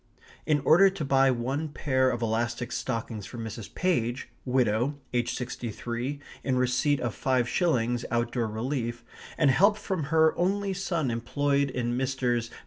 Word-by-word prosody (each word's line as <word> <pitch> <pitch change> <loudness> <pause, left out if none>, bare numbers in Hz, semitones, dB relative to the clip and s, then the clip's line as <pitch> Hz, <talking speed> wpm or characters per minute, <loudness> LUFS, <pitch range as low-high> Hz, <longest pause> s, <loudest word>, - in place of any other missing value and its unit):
In 150 -2 +3
order 175 +7 +6
to 190 -6 -4
buy 135 0 +4
one 130 +5 -1
pair 130 -3 +1
of 120 -1 -2
elastic 115 +2 -1
stockings 115 -2 -3
for 120 - -9
Mrs. 110 -2 -7
Page, 130 -9 0 0.2
widow, 125 +1 +1 0.2
aged 120 -1 0
sixty 125 -1 -4
three, 120 +6 -4 0.2
in 130 -1 0
receipt 130 +3 +2
of 120 -3 -2
five 130 -2 +1
shillings 120 -8 +1
out 120 +1 0
door 120 -3 -1
relief, 120 +1 -3 0.3
and 145 -4 +4
help 200 +9 +4
from 185 -8 -3
her 160 +1 +3
only 195 +2 +1
son 170 -8 -1
employed 140 +4 0
in 120 -2 -2
Messrs. 125 -3 0
130 Hz, 155 wpm, -28 LUFS, 120-145 Hz, 0.3 s, order